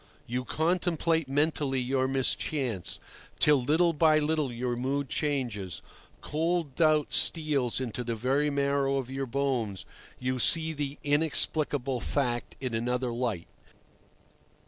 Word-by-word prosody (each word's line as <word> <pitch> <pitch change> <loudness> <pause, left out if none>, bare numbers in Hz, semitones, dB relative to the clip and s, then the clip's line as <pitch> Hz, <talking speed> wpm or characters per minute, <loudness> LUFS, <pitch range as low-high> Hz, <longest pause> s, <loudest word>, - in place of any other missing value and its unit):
You 125 +2 -3
contemplate 165 -1 0
mentally 145 -1 +1
your 130 +1 0
mischance, 130 - 0 0.4
till 150 -3 +4
little 165 +6 +3
by 155 0 +4
little 155 -3 0
your 120 +1 -2
mood 135 +3 -2
changes, 120 - -2 0.4
cold 165 -1 -1
doubt 155 -1 +2
steals 145 -8 +2
into 125 -1 -4
the 115 -1 -2
very 135 +6 +1
marrow 140 -1 +1
of 130 -1 -4
your 135 0 -3
bones, 125 -6 -1 0.3
you 130 0 -2
see 160 +5 +3
the 145 -1 -4
inexplicable 145 -3 +1
fact 120 -1 -2
in 130 -3 -3
another 125 +2 -1
light. 115 -8 -2
135 Hz, 125 wpm, -28 LUFS, 125-150 Hz, 0.4 s, till